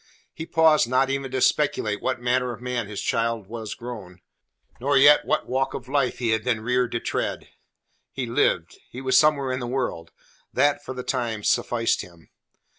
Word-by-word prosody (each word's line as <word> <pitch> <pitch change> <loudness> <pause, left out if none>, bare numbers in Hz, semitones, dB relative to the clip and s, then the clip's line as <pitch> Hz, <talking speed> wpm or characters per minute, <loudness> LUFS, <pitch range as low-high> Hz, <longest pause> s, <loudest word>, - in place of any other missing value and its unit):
He 160 - -7
paused 160 -6 +4
not 135 +1 +2
even 135 -1 -2
to 130 0 -2
speculate 135 -9 +1
what 130 -1 -1
manner 125 +1 0
of - - -10
man 125 -3 -3
his 105 -1 -5
child 115 -2 -1
was 110 +1 -6
grown, 105 -7 -9 0.6
nor 140 +3 +2
yet 145 +2 +6
what - - 0
walk 135 +1 -1
of 130 -2 -7
life 135 -2 0
he 120 -2 0
had 110 -1 0
been 115 -3 0
reared 125 +1 0
to 120 - 0
tread. - - -3 0.6
He 135 - -4
lived: 90 -7 0
he 125 - -8
was 130 -1 0
somewhere 140 -2 +4
in 130 - -2
the 120 - -4
world; 120 -10 -3 0.4
that 145 0 +2
for 130 - -7
the 125 - -5
time 115 -5 -2
sufficed 115 +2 +1
him. 85 -2 -15
125 Hz, 190 wpm, -24 LUFS, 115-135 Hz, 0.6 s, yet